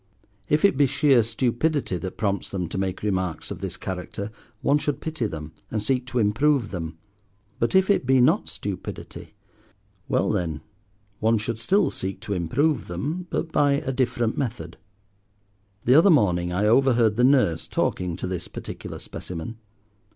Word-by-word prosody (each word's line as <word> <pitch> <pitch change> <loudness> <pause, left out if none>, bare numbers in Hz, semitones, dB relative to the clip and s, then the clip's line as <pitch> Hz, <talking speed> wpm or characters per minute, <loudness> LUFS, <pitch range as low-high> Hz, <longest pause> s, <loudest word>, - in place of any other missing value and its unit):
If 150 +5 +4
it 200 - +3
be 140 -1 +5
sheer 135 -2 +4
stupidity 125 - 0
that 95 +1 -6
prompts 100 -2 -1
them 90 -3 -3
to - - -4
make 95 0 -2
remarks 95 -5 -2
of - - -5
this - - -5
character, 95 +3 -5 0.3
one 145 +1 +3
should 145 -1 -2
pity 155 -8 -2
them, 75 -4 -7 0.2
and 110 - -1
seek 125 +4 0
to 130 -1 -3
improve 120 +3 +2
them. 80 -3 -5 0.6
But 115 - +1
if 190 0 +5
it 200 -11 +2
be 130 0 +5
not 155 +11 +3
stupidity? 100 -3 -6 0.7
well - - +1
then, 80 -4 -2 0.6
one 110 +1 +3
should 110 +1 -3
still 195 - +2
seek 95 +1 -4
to 100 - -3
improve 130 - 0
them, 170 +5 -3
but 165 - -2
by 145 -2 +3
a 140 -1 -1
different 120 -3 0
method. 125 -3 -4 1.1
The 125 - +5
other 165 +8 +7
morning 90 - +3
I 95 +4 +1
overheard 115 -1 +4
the 120 - +2
nurse 125 - +3
talking 90 -2 -1
to - - -5
this 90 -2 -3
particular - - -7
specimen. 90 +6 -7
115 Hz, 165 wpm, -25 LUFS, 95-140 Hz, 1.1 s, other